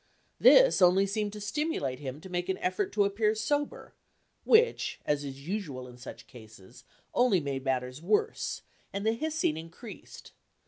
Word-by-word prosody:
This - - +7
only 185 +2 +5
seemed 205 +1 -2
to 210 - -7
stimulate 205 - -2
him 135 -1 -6
to - - -10
make 175 0 -2
an 190 - 0
effort 185 +2 -1
to 205 - +3
appear 210 +2 +1
sober, 290 +6 -2 0.5
which, 465 +2 +3
as 145 -1 0
is 140 +1 -8
usual 155 -11 -4
in 125 0 -14
such 125 - -10
cases, 110 -5 -15 0.3
only 245 -7 +3
made 140 -3 -4
matters 130 +1 -2
worse, 205 +5 0 0.3
and 200 +1 -4
the 220 - +3
hissing 310 - -1
increased. 165 +8 -11
185 Hz, 155 wpm, -29 LUFS, 135-215 Hz, 0.5 s, This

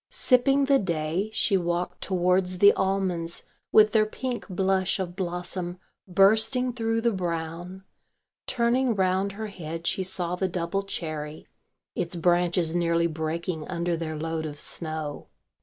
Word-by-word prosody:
Sipping 275 +2 +3
the 275 0 +4
day 170 +2 -1
she 200 -2 +2
walked 175 0 -2
towards 180 0 +1
the 200 +2 +7
almonds 185 -3 -1 0.3
with 215 0 +6
their 215 -1 +3
pink 250 +2 -4
blush 190 0 +1
of 180 -2 -4
blossom 180 -1 -4 0.3
bursting 220 +7 +3
through 225 -1 0
the 235 0 +2
brown; 175 0 -4 0.6
turning 240 0 +2
round 190 +1 +1
her 220 +2 -5
head 165 -5 -7
she 190 - 0
saw 180 -2 -2
the 190 +1 0
double 180 +2 -2
cherry, 155 -5 -5 0.5
its 175 0 -3
branches 175 -1 +2
nearly 170 -1 +2
breaking 160 0 -3
under 170 -1 -1
their 160 -1 -4
load 160 0 -3
of 145 -1 -8
snow. 155 -3 -4
180 Hz, 140 wpm, -26 LUFS, 170-195 Hz, 0.6 s, the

